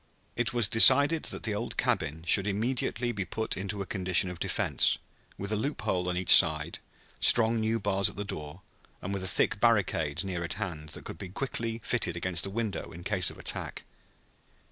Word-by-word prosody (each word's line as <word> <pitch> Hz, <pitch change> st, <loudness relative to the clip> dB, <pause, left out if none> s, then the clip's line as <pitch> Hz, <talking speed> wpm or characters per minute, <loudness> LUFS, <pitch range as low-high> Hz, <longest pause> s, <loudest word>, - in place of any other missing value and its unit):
It 120 Hz, -1 st, -1 dB
was 120 Hz, -4 st, +1 dB
decided 140 Hz, +9 st, +6 dB
that -, -, -3 dB
the 110 Hz, -, -1 dB
old 110 Hz, +4 st, -5 dB
cabin 80 Hz, +3 st, -1 dB
should 100 Hz, +4 st, +3 dB
immediately 120 Hz, +2 st, -2 dB
be 100 Hz, -4 st, -4 dB
put 110 Hz, +4 st, -3 dB
into 100 Hz, +1 st, -4 dB
a -, -, -11 dB
condition 90 Hz, -1 st, 0 dB
of 90 Hz, -, -10 dB
defense, -, -, +2 dB, 0.4 s
with 100 Hz, +2 st, -4 dB
a -, -, +1 dB
loophole 105 Hz, -7 st, -2 dB
on 90 Hz, -, -2 dB
each 90 Hz, -, +7 dB
side, 80 Hz, 0 st, +3 dB, 0.4 s
strong 115 Hz, -1 st, +3 dB
new 110 Hz, +1 st, -1 dB
bars 100 Hz, -1 st, +1 dB
at -, -, -12 dB
the 100 Hz, -, -4 dB
door, 75 Hz, -2 st, -8 dB, 0.4 s
and 95 Hz, -, -5 dB
with 95 Hz, -1 st, -3 dB
a -, -, -2 dB
thick 95 Hz, -, +1 dB
barricade 90 Hz, -8 st, +1 dB
near 90 Hz, -3 st, -4 dB
at 85 Hz, -, -3 dB
hand 85 Hz, -7 st, -6 dB
that -, -, -5 dB
could 80 Hz, -, -8 dB
be 95 Hz, -, -7 dB
quickly 115 Hz, +1 st, -4 dB
fitted 115 Hz, -8 st, -1 dB
against 85 Hz, -1 st, -1 dB
the 100 Hz, -, -4 dB
window 110 Hz, 0 st, -4 dB
in 85 Hz, +2 st, -11 dB
case -, -, +2 dB
of -, -, -10 dB
attack. -, -, -1 dB
100 Hz, 195 wpm, -28 LUFS, 90-115 Hz, 0.4 s, each